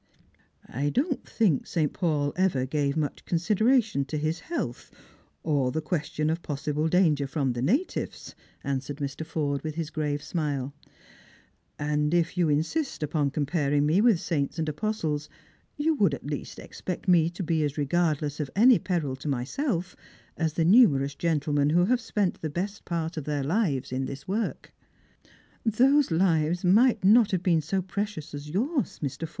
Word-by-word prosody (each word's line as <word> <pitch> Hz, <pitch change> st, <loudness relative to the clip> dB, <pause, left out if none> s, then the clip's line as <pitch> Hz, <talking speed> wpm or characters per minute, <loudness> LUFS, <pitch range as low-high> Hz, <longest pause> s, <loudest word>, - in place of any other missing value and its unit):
" -, -, -35 dB, 0.2 s
I 140 Hz, +4 st, -2 dB
don't 270 Hz, -, -1 dB
think 190 Hz, -, +1 dB
St. 155 Hz, -4 st, 0 dB
Paul 150 Hz, -5 st, 0 dB
ever 175 Hz, -9 st, +1 dB
gave 140 Hz, +1 st, -1 dB
much 150 Hz, -2 st, -2 dB
consideration 210 Hz, -, +2 dB
to 150 Hz, +3 st, -4 dB
his 155 Hz, +2 st, -1 dB
health, 295 Hz, -, -5 dB, 0.5 s
or 140 Hz, -5 st, +1 dB
the 160 Hz, -, -1 dB
question 155 Hz, -1 st, -1 dB
of 165 Hz, +2 st, -2 dB
possible 150 Hz, +1 st, -2 dB
danEfer 155 Hz, -6 st, +2 dB
from 135 Hz, -4 st, 0 dB
the 120 Hz, -, -4 dB
natives," 255 Hz, -, -1 dB, 0.3 s
answered 140 Hz, 0 st, -3 dB
Mr. 140 Hz, +1 st, -4 dB
Forde, 150 Hz, -3 st, -2 dB
with 155 Hz, -1 st, -4 dB
his 165 Hz, -1 st, -4 dB
grave 145 Hz, -2 st, -2 dB
smile; 145 Hz, -5 st, -2 dB, 1.0 s
"and 150 Hz, +2 st, 0 dB
if 170 Hz, 0 st, +1 dB
you 175 Hz, -3 st, +2 dB
insist 160 Hz, -, -1 dB
upon 150 Hz, -1 st, 0 dB
comparing 145 Hz, 0 st, 0 dB
me 165 Hz, +7 st, +3 dB
with 225 Hz, -6 st, +4 dB
saints 155 Hz, -4 st, -2 dB
and 160 Hz, -1 st, -1 dB
apostles, 155 Hz, -3 st, -2 dB, 0.5 s
you 310 Hz, +2 st, +2 dB
would 200 Hz, -, +2 dB
at -, -, -13 dB
least 145 Hz, -1 st, -5 dB
expect 180 Hz, +1 st, -6 dB
me 170 Hz, -3 st, +5 dB
to 175 Hz, +2 st, -6 dB
be 160 Hz, -2 st, +1 dB
as 145 Hz, 0 st, -2 dB
regardless 150 Hz, -1 st, 0 dB
of 145 Hz, -3 st, -2 dB
any 235 Hz, +3 st, +6 dB
peril 160 Hz, -8 st, -2 dB
to 135 Hz, -, -8 dB
myself 170 Hz, -, -2 dB, 0.4 s
as 160 Hz, -2 st, -1 dB
the 165 Hz, 0 st, +1 dB
numerous 155 Hz, -, +5 dB
gentlemen 145 Hz, -2 st, +1 dB
who 175 Hz, +3 st, +4 dB
have 245 Hz, +4 st, +2 dB
spent 210 Hz, -4 st, -1 dB
the 155 Hz, -, -2 dB
best 195 Hz, +7 st, -4 dB
part 165 Hz, -1 st, -3 dB
of 150 Hz, -, -4 dB
their 145 Hz, -2 st, -1 dB
hves 145 Hz, -, 0 dB
in 130 Hz, +1 st, -1 dB
this 140 Hz, +7 st, -8 dB
work." 215 Hz, +4 st, -3 dB, 0.5 s
" -, -, -28 dB, 0.2 s
Those 260 Hz, +6 st, +3 dB
lives 165 Hz, -1 st, +1 dB
may 220 Hz, +7 st, +5 dB
not 215 Hz, +3 st, +6 dB
have 185 Hz, -2 st, -1 dB
been 170 Hz, -4 st, +3 dB
so 185 Hz, +5 st, -1 dB
precious 195 Hz, -4 st, -4 dB
as 145 Hz, +1 st, -7 dB
yours, 255 Hz, -, -1 dB
Jlr. 145 Hz, +3 st, -4 dB
160 Hz, 170 wpm, -27 LUFS, 145-190 Hz, 1.0 s, any